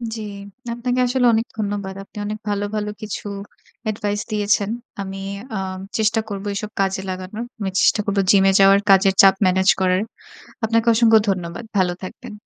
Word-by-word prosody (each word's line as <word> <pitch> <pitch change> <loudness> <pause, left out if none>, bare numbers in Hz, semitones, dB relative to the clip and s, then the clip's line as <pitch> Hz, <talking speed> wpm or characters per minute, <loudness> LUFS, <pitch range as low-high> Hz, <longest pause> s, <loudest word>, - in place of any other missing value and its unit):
জি। 220 - -6 0.5
আপনাকে 245 +1 -1
আসলে 250 0 +1
অনেক 225 +1 +1
ধন্যবাদ। 200 -2 -3
আপনি 200 - -17
অনেক 210 +1 -3
ভালো 205 0 -1
ভালো 210 -1 -2
কিছু 215 0 -6 0.6
Advice 205 0 -2
দিয়েছেন। 210 -1 +1 0.3
আমি 195 0 -6 0.4
আ - - -1 0.4
চেষ্টা 220 +1 +2
করবো 200 0 -5
এসব 210 +1 -4
কাজে 195 -1 0
লাগানোর। 185 +5 -5
আমি 200 -2 -2
চেষ্টা - - +4
করব 200 -1 -1
Gym 195 -1 +6
এ - - +5
যাওয়ার, 195 0 +6
কাজের 195 0 +6
চাপ 195 -1 +6
Manage 190 +1 +4
করার। 185 0 +2 0.6
আপনাকে 230 +1 +1
অসংখ্য 225 -1 +6
ধন্যবাদ। 180 +2 -2
ভালো 185 -2 +2
থাকবেন। 215 +4 -8
205 Hz, 165 wpm, -21 LUFS, 195-220 Hz, 0.6 s, Gym